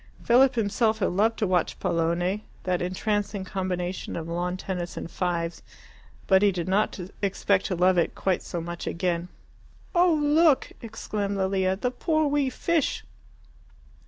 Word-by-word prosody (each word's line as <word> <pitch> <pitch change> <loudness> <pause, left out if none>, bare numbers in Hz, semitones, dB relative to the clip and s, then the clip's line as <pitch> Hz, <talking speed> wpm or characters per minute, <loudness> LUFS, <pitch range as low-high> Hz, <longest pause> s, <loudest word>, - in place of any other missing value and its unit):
Philip 250 +2 +5
himself 220 0 +1
had 200 - 0
loved 215 +5 +2
to 215 - +1
watch 180 -3 0
pallone, 170 +4 0 0.2
that 180 -1 0
entrancing 200 +2 -1
combination 185 -1 -3
of 165 -1 -4
lawn 175 +2 -2
tennis 180 -2 -5
and - - -6
fives. 170 -2 -2 0.6
But 190 -1 +5
he 205 -1 +5
did 175 -2 -4
not 200 +2 +1 0.2
expect 200 -1 +1
to 185 - -1
love 180 +1 +4
it 170 - 0
quite 190 -2 0
so 175 - -5
much 170 +1 -6
again. 170 0 -1 0.7
"Oh, 355 -1 +5
look!" 300 0 +3
exclaimed 210 -3 -3
Lilia, 190 -1 +1
"the 245 +6 -2
poor 315 +4 +1
wee 285 -2 +1
fish!" 325 +3 0
190 Hz, 150 wpm, -26 LUFS, 180-220 Hz, 0.7 s, Philip